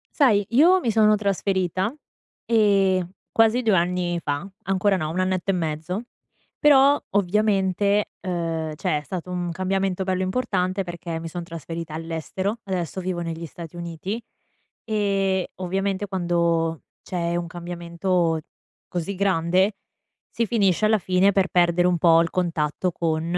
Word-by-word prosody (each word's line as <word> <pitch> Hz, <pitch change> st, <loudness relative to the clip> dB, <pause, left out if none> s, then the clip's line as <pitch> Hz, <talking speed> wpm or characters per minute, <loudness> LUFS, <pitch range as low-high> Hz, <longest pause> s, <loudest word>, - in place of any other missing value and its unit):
Sai, 220 Hz, -9 st, +4 dB
io 330 Hz, +10 st, +5 dB
mi 245 Hz, -, -1 dB
sono 215 Hz, -1 st, +5 dB
trasferita, 195 Hz, -, 0 dB, 0.5 s
ehm, 195 Hz, -5 st, +3 dB, 0.2 s
quasi 225 Hz, +2 st, +4 dB
2 220 Hz, -4 st, +3 dB
anni 175 Hz, 0 st, 0 dB
fa, 145 Hz, +7 st, -3 dB
ancora 195 Hz, +1 st, +2 dB
no, 155 Hz, -3 st, -2 dB
un 175 Hz, -, -2 dB
annetto 185 Hz, 0 st, 0 dB
e -, -, -1 dB
mezzo, 165 Hz, +4 st, -3 dB, 0.6 s
però 285 Hz, -1 st, +6 dB
ovviamente, 200 Hz, 0 st, +2 dB
ehm, 165 Hz, -3 st, -2 dB
cioè 150 Hz, -, 0 dB
è -, -, -12 dB
stato 180 Hz, +3 st, -6 dB
un 175 Hz, -1 st, -2 dB
cambiamento 190 Hz, +1 st, -1 dB
bello 185 Hz, 0 st, 0 dB
importante, 190 Hz, -2 st, -1 dB
perché 175 Hz, -2 st, -5 dB
mi 165 Hz, -, -6 dB
son 175 Hz, +1 st, -5 dB
trasferita 165 Hz, -1 st, -7 dB
all'estero, 165 Hz, +6 st, -3 dB
adesso 185 Hz, -2 st, -3 dB
vivo 180 Hz, -1 st, -3 dB
negli 165 Hz, 0 st, -4 dB
Stati 165 Hz, +1 st, -10 dB
Uniti; 170 Hz, +5 st, -5 dB, 0.6 s
e, 195 Hz, -3 st, 0 dB
ovviamente, 195 Hz, +2 st, -2 dB
quando 170 Hz, -3 st, 0 dB, 0.2 s
c'è 170 Hz, -1 st, -2 dB
un 175 Hz, 0 st, -2 dB
cambiamento 170 Hz, 0 st, -1 dB, 0.5 s
così 180 Hz, +3 st, -3 dB
grande, 185 Hz, +1 st, +2 dB, 0.6 s
si 230 Hz, -, -1 dB
finisce 205 Hz, -3 st, +2 dB
alla 215 Hz, 0 st, +3 dB
fine 185 Hz, +2 st, +3 dB
per 195 Hz, -1 st, +2 dB
perdere 175 Hz, 0 st, +3 dB
un 180 Hz, -1 st, +2 dB
po' 165 Hz, 0 st, +5 dB
il 170 Hz, -, 0 dB
contatto 170 Hz, -1 st, -1 dB
con, 160 Hz, -2 st, -1 dB
185 Hz, 140 wpm, -24 LUFS, 170-200 Hz, 0.6 s, però